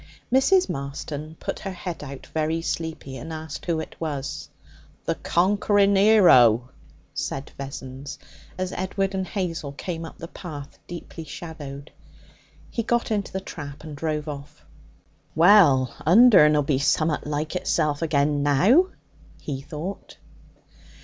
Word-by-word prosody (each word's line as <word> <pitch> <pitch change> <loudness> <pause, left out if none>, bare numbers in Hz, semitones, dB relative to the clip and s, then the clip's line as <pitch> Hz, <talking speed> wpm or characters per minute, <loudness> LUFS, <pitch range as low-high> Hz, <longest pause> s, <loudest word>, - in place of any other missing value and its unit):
Mrs. 365 +8 +4
Marston 145 +3 -5
put - - -4
her 195 -2 -5
head 175 -3 -6
out, 135 -1 -8
very 160 +1 0
sleepy, 160 -6 -4
and 160 +6 -8
asked 155 0 -7
who 165 -2 +1
it 160 - -7
was. 145 -2 -4 0.6
'The - - +1
conquering 200 +2 +2
'ero!' 130 - +6 0.4
said 135 +1 -4
Vessons, 135 0 -7 0.4
as 185 0 -2
Edward 195 +1 -2
and 190 -1 -2
Hazel 165 -8 -3
came 165 +3 -5
up 165 - -9
the 165 - -7
path, 150 -6 -9
deeply 170 -1 -8
shadowed. 150 -3 -8 0.8
He 230 - -1
got 235 0 0
into 205 -2 -1
the 190 - -2
trap 145 -6 -8
and 155 -2 -8
drove 150 0 -2
off. 145 -1 -8 0.7
'Well, 160 - +6
Undern'll 165 -6 +7
be 135 -1 +1
summat 155 +2 +1
like 150 +3 -2
itself 155 -4 0
again 145 -2 +1
now,' 185 - +5 0.5
he 135 -3 -5
thought. 155 +7 -7
155 Hz, 130 wpm, -24 LUFS, 145-185 Hz, 0.8 s, Undern'll